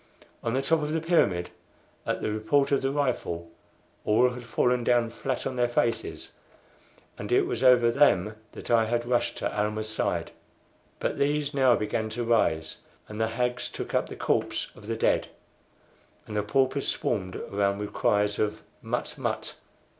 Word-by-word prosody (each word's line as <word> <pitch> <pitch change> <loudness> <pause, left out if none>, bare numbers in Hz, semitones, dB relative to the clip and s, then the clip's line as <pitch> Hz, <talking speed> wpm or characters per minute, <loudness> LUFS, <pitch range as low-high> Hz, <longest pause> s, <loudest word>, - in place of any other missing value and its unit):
On 115 +1 -1
the 135 - 0
top 160 +3 +2
of 150 +1 -2
the 165 - +1
pyramid, 125 - +2 0.6
at - - -1
the 110 - 0
report 110 +7 +1
of 140 - +3
the 135 - 0
rifle, 125 -12 -2 0.5
all 115 +4 +4
had 125 -1 -8
fallen 125 +1 +1
down 120 -1 +2
flat 130 +2 -3
on 130 -1 -3
their 120 -1 +2
faces, 120 -1 -1 0.9
and - - -6
it - - +5
was - - -3
over 125 -2 +6
them 110 -7 +3 0.2
that - - -7
I 115 -1 +5
had 120 +1 -1
rushed 120 0 0
to - - -3
Almah's 105 +1 -1
side. 110 - -1 0.7
But - - -2
these 145 +1 +1
now 130 -3 +5
began 110 +1 -2
to 120 - 0
rise, 80 -9 +1 0.3
and 105 +1 -5
the 110 - +2
hags 125 +2 -1
took - - -6
up - - +1
the - - -7
corpse - - -1
of 105 - -13
the 115 - -1
dead, - - +2 1.0
and 105 - -7
the 105 - +2
paupers 130 +6 +1
swarmed 95 -2 -1
around 100 0 -1
with 105 0 -5
cries 105 0 +1
of 105 -1 -1 0.2
"Mut! - - -3
120 Hz, 170 wpm, -27 LUFS, 105-130 Hz, 1.0 s, over